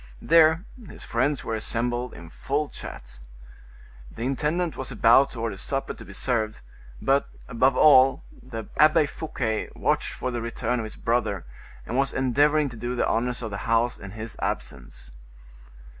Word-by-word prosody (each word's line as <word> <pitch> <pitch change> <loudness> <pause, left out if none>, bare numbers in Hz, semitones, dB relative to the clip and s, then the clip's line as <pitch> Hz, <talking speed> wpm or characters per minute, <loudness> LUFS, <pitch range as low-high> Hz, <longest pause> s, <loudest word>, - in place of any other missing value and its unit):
There 165 +2 +4 0.2
his - - -10
friends 135 +4 0
were - - -3
assembled 120 +3 -2
in 85 -1 -11
full 145 +2 -2
chat. - - -10 0.9
The 115 - -7
intendant 150 +6 -1
was 130 - -6
about 120 +3 +5
to 120 - -9
order 115 -4 -3
supper 135 +6 -2
to - - -12
be - - -12
served, 110 -4 -1 0.4
but, 135 +1 +1 0.2
above 130 +3 +2
all, 135 -3 +6 0.2
the 115 -4 -7
Abbe 155 +1 +5
Fouquet 125 -7 -3
watched - - 0
for 130 - -3
the 120 -1 -3
return 115 +1 -2
of 110 - -3
his 110 - -8
brother, 110 -6 -1 0.4
and 120 - -3
was 135 0 +1
endeavoring 145 +4 +3
to 120 - -10
do 120 +2 -3
the - - +1
honors 125 +2 -1
of 110 - -4
the 100 - -4
house 115 +1 +2
in 100 - -9
his 110 +3 -7
absence. 60 -1 -5
125 Hz, 165 wpm, -25 LUFS, 115-140 Hz, 0.9 s, all